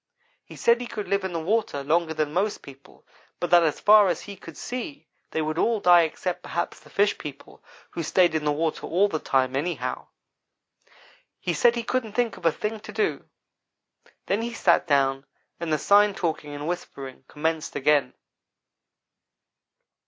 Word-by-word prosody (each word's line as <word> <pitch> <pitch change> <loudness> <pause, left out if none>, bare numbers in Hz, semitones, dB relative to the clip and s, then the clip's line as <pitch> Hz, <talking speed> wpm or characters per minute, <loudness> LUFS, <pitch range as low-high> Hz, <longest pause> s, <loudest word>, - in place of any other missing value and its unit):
He - - -13
said 235 +1 +3
he 245 - -5
could 210 -3 -5
live 200 +1 0
in 190 - -3
the 170 - -2
water 180 -5 -1
longer 160 +2 +1
than 150 -1 -1
most 200 +4 -1
people, 135 0 -15 0.3
but 175 - -3
that 175 -1 +7
as 160 -3 0
far 210 -1 +7
as 175 - -1
he 200 - -9
could 165 -4 -12
see 255 +4 -6 0.2
they 160 - -1
would 155 +2 -2
all 230 -2 +2
die 175 -2 +6
except, 175 +2 -2
perhaps, 170 - -4
the - - -18
fish 205 +1 +1
people, 145 -2 -10 0.3
who 170 - -4
stayed 175 +2 +3
in 160 -1 -1
the 150 - +1
water 155 +2 -2
all 190 +5 +3
the 160 -6 -3
time, 130 -2 +1
anyhow. 140 -3 -3 1.3
He 175 - -2
said 235 +10 +4
he 235 - -2
couldn't 235 -3 -2
think 240 -1 0
of - - -1
a - - +5
thing 215 +7 -4
to 210 - -10
do 205 -9 -2 1.0
then 200 +3 0
he 235 0 -4
sat 175 -6 +3
down 135 -2 +2 0.4
and 170 -1 -3
the 155 - +3
sign 205 +4 +4
talking 160 -5 -3
and 145 +1 -5
whispering 135 -7 -6
commenced 160 +1 -3
again. 145 -2 +2
170 Hz, 180 wpm, -25 LUFS, 150-205 Hz, 1.3 s, that